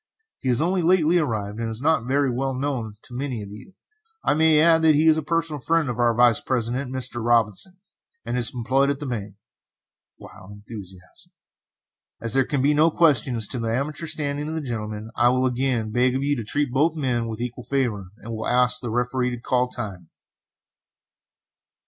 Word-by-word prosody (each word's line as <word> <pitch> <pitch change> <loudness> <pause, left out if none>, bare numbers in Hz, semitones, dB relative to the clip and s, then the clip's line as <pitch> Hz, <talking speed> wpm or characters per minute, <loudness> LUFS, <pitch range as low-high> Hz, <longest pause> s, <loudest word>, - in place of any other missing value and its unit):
As 445 0 -55
he 130 - -1
has 125 +1 +2
only 180 +2 +1
lately 175 0 +3
arrived, 110 -7 -3
and 115 -1 -2
is 110 0 -4
not 145 -4 +1
very 140 0 +1
well 135 +2 -2
known 130 -6 -3
to 125 - -13
many 125 -4 -4
of 100 - -10
you, 145 - -13 0.5
I - - +2
may 155 0 +4
add 165 +1 +5
that 160 -2 +5
he 155 +2 +3
is 160 - +6
a 160 - -1
personal 165 -1 -1
friend 160 +1 +1
of 120 - -7
our 120 -1 +3
Vice 120 -2 +4
president, 125 +1 -2
Mr. 125 -2 -4
Robinson, 120 - +1 0.5
and - - -3
is 120 -2 +1
employed 130 +3 +1
at 140 -1 -1
his 145 - -5
bank. 105 -5 -5 0.8
[Wild 95 +2 -13
enthusiasm.] 100 -5 -11 0.9
As 115 - 0
there 135 -1 +3
can 140 -1 -1
be 145 +2 +4
no 155 +3 +4
question 140 -7 +3
as 110 -3 -1
to 125 - -2
the 115 -1 -2
amateur 150 +5 -3
standing 145 -1 -2
of 160 - -4
the 160 - -2
gentlemen, 110 -4 -5
I 120 +1 +4
will 130 +1 +1
again 125 -3 0
beg 125 +3 +2
of 135 - -1
you 145 +1 +1
to 120 - -4
treat 145 +4 -1
both 150 +5 +2
men 125 -6 -1
with 110 -1 -6
equal 125 +1 -5
favor, 120 -9 -1
and 115 +1 -8
will 110 0 -4
ask 125 0 +3
the 120 - -4
Referee 125 +2 0
to 120 -1 -5
call 125 +1 +1
time!" 95 -10 -7
125 Hz, 205 wpm, -23 LUFS, 115-145 Hz, 0.9 s, is